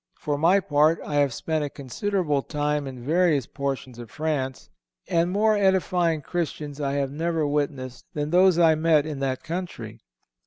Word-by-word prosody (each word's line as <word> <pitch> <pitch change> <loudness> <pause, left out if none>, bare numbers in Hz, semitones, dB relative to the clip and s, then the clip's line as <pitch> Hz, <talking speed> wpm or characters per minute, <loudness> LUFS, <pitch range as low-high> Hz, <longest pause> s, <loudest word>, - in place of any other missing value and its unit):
For 145 - -2
my 170 +7 +4
part, 155 -1 +2
I 145 - -2
have 140 -2 +3
spent 155 +5 -2
a 145 - -3
considerable 150 - -1
time 150 0 -2
in 130 -2 -8
various 155 -1 +2
portions 135 -3 -4
of 120 -2 -9
France, 145 -3 -3 0.4
and 170 +1 +1
more 215 +3 +3
edifying 180 -5 +1
Christians 150 -4 -4
I 140 -1 -1
have 140 -1 -1
never 165 +1 -1
witnessed 140 -4 -3
than 150 0 -2
those 180 0 +5
I 165 -2 +6
met 155 -1 +3
in 150 -3 -5
that 130 -1 -2
country. 175 +2 -6
150 Hz, 165 wpm, -25 LUFS, 140-170 Hz, 0.4 s, I